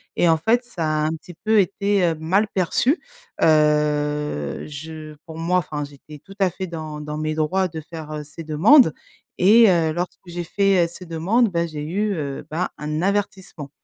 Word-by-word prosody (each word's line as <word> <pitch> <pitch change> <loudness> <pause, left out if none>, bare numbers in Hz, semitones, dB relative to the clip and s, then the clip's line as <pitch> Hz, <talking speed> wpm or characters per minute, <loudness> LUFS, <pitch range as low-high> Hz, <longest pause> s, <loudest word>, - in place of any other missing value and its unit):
et 175 - +3
en 160 - +4
fait, 225 +9 +2
ça 190 -9 -4
a 155 0 0
un - - +1
petit 175 +3 -12
peu 220 0 +4
été, 200 +1 +1
heu, 165 -1 +1
mal 180 +7 +1
perçu. 205 - +1 0.4
Heu, 150 - +1
je 155 +1 -8
pour 160 -1 -9
moi 170 +2 +1
enfin, 150 -3 -4
j'étais 145 +1 -12
tout 195 +7 -15
à 190 -2 +3
fait 185 +2 -5
dans 155 -3 -6
dans 150 0 -5
mes 155 0 -2
droits 185 +5 +1
de 160 -2 -7
faire, 155 0 -9
heu, 150 -1 -5
ces 150 +3 -10
demandes 160 - +5 0.5
et 220 +4 +7
heu, 165 -3 +2
lorsque 175 +3 -4
j'ai 175 0 -5
fait, 195 -1 +2
heu, - - -3
ces 180 +1 -11
demandes, 190 +9 +1
ben, 170 -1 0
j'ai 155 -2 -6
eu, 200 +7 -1
heu, 145 -3 -5
bah, 165 +4 -2
un 150 +1 -3
avertissement. 190 -6 -2
165 Hz, 195 wpm, -22 LUFS, 150-190 Hz, 0.5 s, et